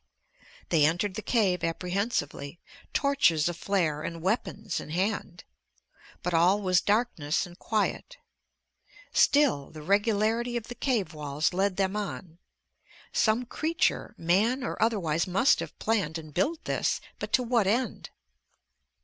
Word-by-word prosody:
They 160 -4 +4
entered 175 +6 +1
the 215 - -5
cave 200 -7 +1
apprehensively, 175 - -2 0.3
torches 275 - +3
aflare 170 -3 0
and 165 +1 -6
weapons 205 0 -1
in - - -9
hand. 185 +1 -2 0.8
But 180 - -1
all 175 +5 +4
was 185 -1 +3
darkness 205 -8 0
and 175 0 -14
quiet. 215 -2 -2 1.0
Still, 280 - +3
the 155 -1 -10
regularity 220 +5 +1
of 235 0 -7
the - - -4
cave 230 - -1
walls 150 +2 -1
led 190 +1 0
them 195 0 0
on. 190 -5 -5 0.7
Some 225 +3 +2
creature, 320 +7 -1
man 215 +10 +2
or - - -4
otherwise, 175 -8 +1
must 195 +8 +3
have - - -6
planned 195 -8 0
and 155 -2 -10
built 305 - -1
this... - - 0 0.2
but - - -5
to 255 - +4
what 230 -4 +2
end? 240 +5 -1
195 Hz, 130 wpm, -28 LUFS, 165-225 Hz, 1.0 s, They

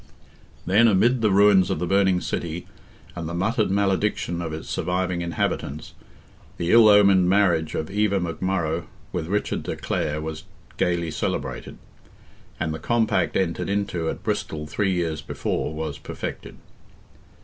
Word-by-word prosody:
Then, 105 +6 +5
amid 115 +4 +3
the 110 - +3
ruins 100 -2 +5
of - - 0
the 90 - -2
burning 95 -1 +2
city, 85 +1 -4 0.5
and 85 -2 -5
the 85 - -4
muttered 110 +4 +1
malediction 95 -3 0
of 80 -2 -4
its 80 0 -6
surviving 90 0 -1
inhabitants, 80 -3 -3 0.6
the 85 0 -1
ill 115 -2 +8
omened 100 -3 +6
marriage 90 -5 +2
of 80 - -3
Eva 105 -1 +1
McMurrogh 85 -1 -2 0.2
with 80 -3 -3
Richard 105 +3 -1
de - - -4
Clare 75 0 -2
was 80 0 -6 0.3
gaily 85 -2 0
celebrated, - - -4 0.8
and 80 -1 -1
the 80 - -5
compact 115 +5 +1
entered 90 -2 -1
into 100 -5 -1
at - - -6
Bristol 75 -1 -2
three 95 +5 -1
years 85 -4 -1
before 75 - -3
was 80 -2 -5
perfected. - - -7
90 Hz, 145 wpm, -24 LUFS, 80-100 Hz, 0.8 s, ill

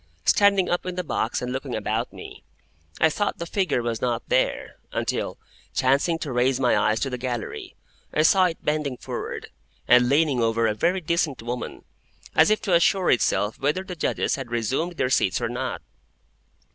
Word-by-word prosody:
Standing 200 -2 +4
up 175 - 0
in 180 - -3
the 180 - -2
box 120 -7 -2
and 125 0 -3
looking 130 - -4
about - - -2
me, - - -11 0.6
I 160 - +6
thought 205 +6 -1
the 170 - -5
figure 170 - 0
was 115 -1 -2
not 120 -2 -2
there, 130 - 0
until, - - -2 0.4
chancing 140 +6 +2
to 155 -4 -5
raise 125 +1 +2
my 125 -2 +3
eyes 110 +1 +2
to 135 - -1
the 125 - -4
gallery, 120 -2 -5 0.4
I 155 - +2
saw 185 +3 +5
it 170 -3 -3
bending 150 -4 -1
forward, - - -6 0.4
and 125 0 +6
leaning 140 -3 +2
over 115 0 +2
a 110 - +2
very 175 - 0
decent 160 -7 -1
woman, 120 +1 -5 0.5
as - - +5
if 215 - +3
to 195 - 0
assure 180 +2 +4
itself 110 -3 +1
whether 150 +7 0
the 185 -1 -7
Judges 160 - -1
had 135 -3 -6
resumed 130 +9 -1
their 130 -6 -1
seats 95 -7 +2
or - - -2
not. 125 +2 -4
135 Hz, 185 wpm, -24 LUFS, 120-170 Hz, 0.6 s, I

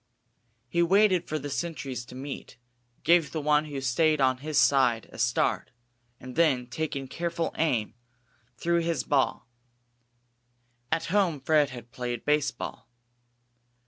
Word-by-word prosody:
He 170 +6 +1
waited 185 0 +4
for 155 - -1
the 145 -1 -6
sentries 140 -6 -4
to 125 - -12
meet; 135 -1 -7 0.5
gave 170 -4 +4
the 160 - -2
one 150 0 +2
who 145 -2 -5
stayed 155 +4 +2
on 130 -1 +3
his 150 +2 -3
side 125 -5 +3
a - - -11
start, 120 +1 +1 0.5
and 125 0 -9
then, 145 -7 +3
taking 135 +1 -4
careful 170 +3 -3
aim, 125 -10 0 0.6
threw 170 0 +1
his 170 0 -1
ball. 135 -3 0 1.4
At 160 +1 0
home 185 -8 +2
Fred 150 +1 +3
had 120 -2 -10
played 120 -2 -4
baseball. 150 -1 -1
145 Hz, 135 wpm, -27 LUFS, 130-165 Hz, 1.4 s, waited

